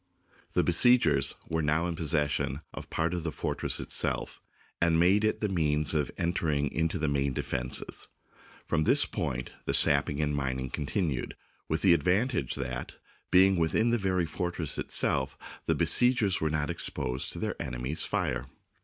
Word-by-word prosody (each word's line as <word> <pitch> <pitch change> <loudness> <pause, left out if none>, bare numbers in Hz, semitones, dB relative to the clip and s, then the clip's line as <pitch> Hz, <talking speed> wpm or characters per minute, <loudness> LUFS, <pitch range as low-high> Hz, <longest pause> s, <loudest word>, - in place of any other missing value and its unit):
The - - +3
besiegers 85 - +4
were 80 0 -1
now 75 +3 +1
in 85 -1 -2
possession 75 -3 -1
of - - -8
part 80 +1 -1
of 85 -2 -3
the 80 - -2
fortress - - -2
itself, - - -1 0.4
and 85 -1 +3
made 95 +5 +4
it 110 - 0
the 105 - +1
means 75 -5 0
of 75 -4 0
enter 85 -1 -1
ing 70 -2 0
into 80 +2 -1
the 80 -2 -1
main 70 -1 0
defences. 60 0 -3 0.6
From 80 -2 0
this - - +4
point 60 +1 -4
the - - +1
sap 70 0 +6
ping 70 - -4
and 75 -1 0
mining 65 -2 -2
continued, 75 - -2 0.3
with 80 - -1
the 95 -3 +6
advantage 90 - +1
that, 65 -2 -5 0.3
being 95 +1 +5
within 95 +8 +2
the 120 - +1
very 95 -3 0
fortress 85 -1 -3
itself, 65 0 0 0.3
the - - +2
be - - +1
siegers 120 -6 +3
were 80 - +1
not 75 -1 -1
exposed 65 +2 -3
to - - -7
their - - -3
enemy's 65 +5 -2
fire. 60 +1 -2
80 Hz, 170 wpm, -29 LUFS, 70-90 Hz, 0.6 s, sap